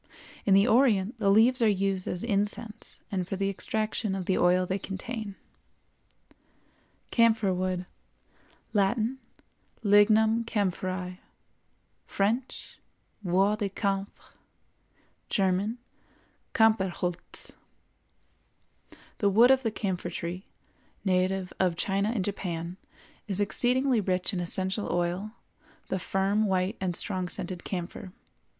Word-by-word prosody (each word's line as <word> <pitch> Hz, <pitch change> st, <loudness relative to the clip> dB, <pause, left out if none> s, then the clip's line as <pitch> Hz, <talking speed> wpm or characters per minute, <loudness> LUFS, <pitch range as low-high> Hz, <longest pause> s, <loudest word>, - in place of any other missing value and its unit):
In 195 Hz, -, +6 dB
the 200 Hz, +3 st, +5 dB
Orient 230 Hz, -3 st, +3 dB
the 200 Hz, -2 st, +2 dB
leaves 230 Hz, +5 st, +5 dB
are 225 Hz, -, +5 dB
used 195 Hz, -2 st, 0 dB
as 180 Hz, -, -2 dB
incense 210 Hz, 0 st, -2 dB
and 185 Hz, -3 st, -2 dB
for 195 Hz, -, -3 dB
the 195 Hz, +1 st, 0 dB
extraction 215 Hz, 0 st, -2 dB
of 190 Hz, -2 st, -4 dB
the 190 Hz, -, +1 dB
oil 180 Hz, +1 st, +3 dB
they 190 Hz, +2 st, -2 dB
contain. 205 Hz, +2 st, -5 dB, 1.8 s
CAMPHOR 225 Hz, -4 st, +3 dB
WOOD. 185 Hz, 0 st, -2 dB, 0.9 s
Latin—Lignum 220 Hz, 0 st, +1 dB
Camphoræ; 185 Hz, -3 st, -2 dB, 0.9 s
French—Bois 205 Hz, -3 st, -2 dB
de 205 Hz, -2 st, -1 dB
camphre; 195 Hz, 0 st, -3 dB, 1.0 s
German—Campherholz. 195 Hz, -2 st, -1 dB, 1.7 s
The 205 Hz, -, +3 dB
wood 230 Hz, +6 st, +6 dB
of 265 Hz, 0 st, +4 dB
the 230 Hz, -, 0 dB
Camphor 190 Hz, -5 st, -3 dB
tree, 175 Hz, +2 st, -5 dB, 0.6 s
native 185 Hz, 0 st, +1 dB
of 180 Hz, -3 st, +2 dB
China 195 Hz, +4 st, 0 dB
and 215 Hz, -5 st, -1 dB
Japan, 175 Hz, -3 st, -4 dB, 0.5 s
is 200 Hz, -2 st, -2 dB
exceedingly 250 Hz, +4 st, +2 dB
rich 185 Hz, +1 st, -1 dB
in 185 Hz, -, -1 dB
essential 190 Hz, +4 st, 0 dB
oil, 175 Hz, +5 st, -1 dB, 0.6 s
the 190 Hz, -, -1 dB
firm, 195 Hz, +4 st, +1 dB
white, 185 Hz, 0 st, 0 dB
and 180 Hz, -2 st, -1 dB
strong 185 Hz, -2 st, -1 dB
scented 180 Hz, -2 st, -4 dB
camphor. 180 Hz, 0 st, -5 dB
195 Hz, 105 wpm, -28 LUFS, 185-220 Hz, 1.8 s, In